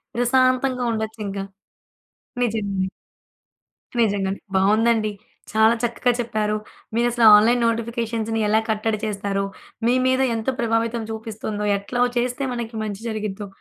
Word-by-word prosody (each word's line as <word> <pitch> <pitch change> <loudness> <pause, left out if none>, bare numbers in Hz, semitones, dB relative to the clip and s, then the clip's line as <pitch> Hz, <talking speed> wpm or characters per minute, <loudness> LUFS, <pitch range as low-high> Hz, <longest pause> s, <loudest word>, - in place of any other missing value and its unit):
ప్రశాంతంగా 255 +1 +2
ఉండొచ్చు 220 0 -4
ఇంకా. 195 0 -4 1.0
నిజమే. 200 -4 -1 1.1
నిజంగానే. 200 -3 0 0.2
బావుందండి. 215 +2 +3 0.4
చాలా 220 +1 +5
చక్కగా 240 +1 +1
చెప్పారు. 215 -2 -1 0.4
మీరు 240 +1 +3
అసలు 235 -1 +3
ఆన్‌లైన్ 235 +3 +4
నోటిఫికేషన్స్‌ని 230 -1 -1
ఎలా 215 +1 +4
కట్టడి 215 0 0
చేస్తారో, 200 -1 -2 0.4
మీ 245 - +4
మీద 260 +1 +2
ఎంత 225 +3 -2
ప్రభావితం 230 0 0
చూపిస్తుందో, 220 -1 -4
ఎట్లా 220 +5 -5
వో - - 0
చేస్తే 250 +3 -1
మనకి 235 -1 -5
మంచి 205 -1 -5
జరిగిద్దో, 210 -2 -4
225 Hz, 120 wpm, -22 LUFS, 210-235 Hz, 1.1 s, చాలా